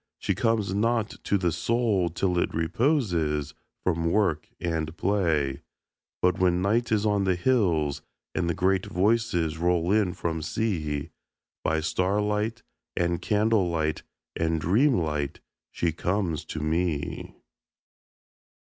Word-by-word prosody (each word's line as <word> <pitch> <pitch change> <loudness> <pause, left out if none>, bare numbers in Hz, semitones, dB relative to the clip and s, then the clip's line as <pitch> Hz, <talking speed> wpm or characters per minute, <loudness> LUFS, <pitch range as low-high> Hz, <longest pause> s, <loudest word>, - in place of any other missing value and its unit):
She - - -1
comes 110 -4 0
not 115 +1 +1
to 100 - +2
the 90 -3 +1
Soul 105 0 +1
till 90 +1 0
it - - -1
reposes 80 - 0 0.3
From 85 -2 +1
work 85 -6 +1
and 80 -1 -2
play. 80 -9 +1 0.6
But 90 0 +3
when 90 -1 +3
Night 115 +4 +1
is 105 -1 +2
on 105 -1 +2
the 95 -1 +2
hills, 85 - +1 0.3
and 85 - 0
the 85 - 0
great 95 +3 +1
Voices 100 -5 +1
Roll 85 +1 +1
in 100 -4 +2
from 80 -1 -2
Sea, 75 -7 -2 0.5
By 80 0 +1
starlight 105 +6 0 0.3
and 85 -1 0
candle 105 -3 +2
light 80 -2 -1 0.3
and 80 0 0
dreamlight 85 - +1 0.3
She 85 - -1
comes 90 0 -1
to 80 - -5
me. 80 -1 -2
90 Hz, 125 wpm, -26 LUFS, 80-105 Hz, 0.6 s, But